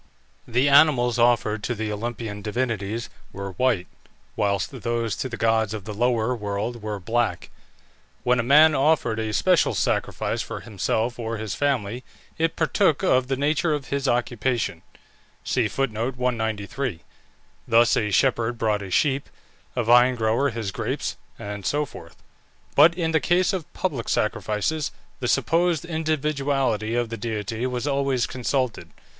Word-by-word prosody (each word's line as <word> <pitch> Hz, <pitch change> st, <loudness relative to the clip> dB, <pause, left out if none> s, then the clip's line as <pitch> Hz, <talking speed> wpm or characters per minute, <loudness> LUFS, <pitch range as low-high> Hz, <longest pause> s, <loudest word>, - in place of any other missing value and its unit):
The 125 Hz, +4 st, +2 dB
animals 135 Hz, -5 st, +5 dB
offered 115 Hz, -3 st, +2 dB
to 120 Hz, -, -1 dB
the 110 Hz, 0 st, -3 dB
Olympian 110 Hz, -1 st, -4 dB
divinities 110 Hz, 0 st, -2 dB, 0.2 s
were 100 Hz, 0 st, -6 dB
white, 105 Hz, -1 st, +1 dB, 0.5 s
whilst 100 Hz, -3 st, 0 dB
those 115 Hz, 0 st, -1 dB
to 130 Hz, -, -3 dB
the 120 Hz, -, -6 dB
gods 110 Hz, -1 st, +1 dB
of 105 Hz, -3 st, -7 dB
the 105 Hz, -, -5 dB
lower 120 Hz, +2 st, +1 dB
world 105 Hz, +2 st, -3 dB
were 105 Hz, -1 st, -4 dB
black. 110 Hz, -2 st, -1 dB, 0.7 s
When 125 Hz, 0 st, +2 dB
a -, -, +4 dB
man 150 Hz, +6 st, +6 dB
offered 135 Hz, -5 st, +2 dB
a 110 Hz, -1 st, -2 dB
special 180 Hz, +10 st, +3 dB
sacrifice -, -, -1 dB
for -, -, -6 dB
himself 110 Hz, +4 st, -2 dB
or 115 Hz, 0 st, -3 dB
his 110 Hz, -2 st, -4 dB
family 125 Hz, -4 st, -1 dB, 0.4 s
it 165 Hz, 0 st, +1 dB
partook 160 Hz, 0 st, +2 dB
of 130 Hz, -8 st, +3 dB
the 135 Hz, -, 0 dB
nature 150 Hz, +3 st, +1 dB
of 145 Hz, -2 st, -7 dB
his 140 Hz, 0 st, -1 dB
occupation; 120 Hz, -6 st, 0 dB, 0.6 s
thus -, -, -2 dB, 2.4 s
a 105 Hz, -, 0 dB
shepherd 120 Hz, +1 st, +1 dB
brought 105 Hz, -2 st, 0 dB
a 100 Hz, -, -7 dB
sheep, 135 Hz, +8 st, +1 dB, 0.5 s
a 120 Hz, -, 0 dB
vine 120 Hz, +2 st, +5 dB
grower 115 Hz, +4 st, +1 dB
his 110 Hz, -5 st, -4 dB
grapes, -, -, -3 dB, 0.2 s
and 105 Hz, -1 st, -6 dB
so 150 Hz, +8 st, 0 dB
forth. 85 Hz, -, -12 dB, 0.6 s
But 160 Hz, +4 st, +6 dB
in 165 Hz, -2 st, -1 dB
the 160 Hz, -, +3 dB
case 175 Hz, +5 st, +2 dB
of 175 Hz, -2 st, -4 dB
public 140 Hz, -11 st, -3 dB
sacrifices, 110 Hz, +8 st, -1 dB, 0.3 s
the 125 Hz, -, -2 dB
supposed 170 Hz, +4 st, +2 dB
individuality 140 Hz, -8 st, -1 dB
of 120 Hz, -1 st, 0 dB
the 115 Hz, -, -5 dB
deity 110 Hz, +2 st, -3 dB
was 125 Hz, 0 st, -3 dB
always 140 Hz, -3 st, +1 dB
consulted. 130 Hz, -2 st, -2 dB
120 Hz, 145 wpm, -24 LUFS, 110-140 Hz, 2.4 s, man